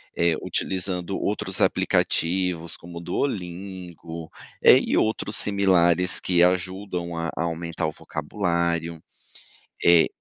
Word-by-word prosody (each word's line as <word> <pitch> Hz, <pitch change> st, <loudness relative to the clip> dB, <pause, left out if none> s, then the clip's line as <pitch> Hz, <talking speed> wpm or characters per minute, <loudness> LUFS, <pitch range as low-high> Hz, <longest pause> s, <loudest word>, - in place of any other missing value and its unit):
Eh, 85 Hz, -1 st, +2 dB
utilizando 95 Hz, 0 st, -2 dB
outros 100 Hz, -2 st, -1 dB
aplicativos 85 Hz, -1 st, 0 dB
como 85 Hz, 0 st, -11 dB
o -, -, -9 dB
Duolingo, 90 Hz, -, -5 dB, 0.3 s
eh, -, -, +8 dB
e -, -, 0 dB
outros 110 Hz, -1 st, 0 dB
similares 90 Hz, -3 st, +3 dB
que 90 Hz, -2 st, +2 dB
ajudam 90 Hz, -1 st, -1 dB
a 85 Hz, 0 st, -2 dB
aumentar 85 Hz, 0 st, -2 dB
o -, -, -3 dB
vocabulário. 85 Hz, 0 st, -2 dB, 0.8 s
Eh 85 Hz, -1 st, +6 dB
85 Hz, 105 wpm, -24 LUFS, 85-95 Hz, 0.8 s, eh